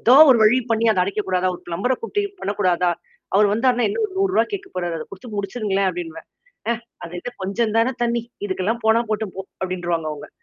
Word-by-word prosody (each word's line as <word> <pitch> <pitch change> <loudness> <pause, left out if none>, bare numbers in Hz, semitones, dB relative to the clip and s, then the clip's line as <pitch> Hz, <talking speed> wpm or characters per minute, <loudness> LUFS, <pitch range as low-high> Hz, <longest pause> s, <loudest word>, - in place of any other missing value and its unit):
ஏதோ 245 - +6 0.2
ஒரு 250 - +6
வழி 220 +4 +6
பண்ணி 225 0 +2
அத 200 -4 +2
அடைக்கக்கூடாதா. 190 -2 -1
ஒரு - - -11
பிளம்பர 180 +9 0
கூப்பட்டு 410 - -1 0.2
பண்ணக்கூடாதா. 185 -3 +1 0.4
அவர் 205 +2 +6
வந்தார்ன்னா 245 +2 +2
என்ன 445 +3 -1 0.2
ரூ.100 390 0 +3
கேட்கப்போபறாரு. 185 - -3
அத 155 - -5
குடுத்து 195 +5 -10
முடிச்சுருங்களேன் 200 -1 0
அப்டின்னுவேன். 330 -2 -7 0.4
ஆ - - +4 0.3
அது 170 +1 -8
இல்ல 210 - -5
கொஞ்சம் 215 +3 0
தானே 230 +3 +3
தண்ணீ. 235 0 +1 0.2
இதுக்கெல்லாம் 205 +4 -1
போனா 220 +1 +5
போட்ட 215 0 0
போ - - -3 0.2
அப்டின்னருவாங்க 175 -3 -1
அவங்க. 150 - -9
210 Hz, 180 wpm, -22 LUFS, 185-240 Hz, 0.4 s, ஏதோ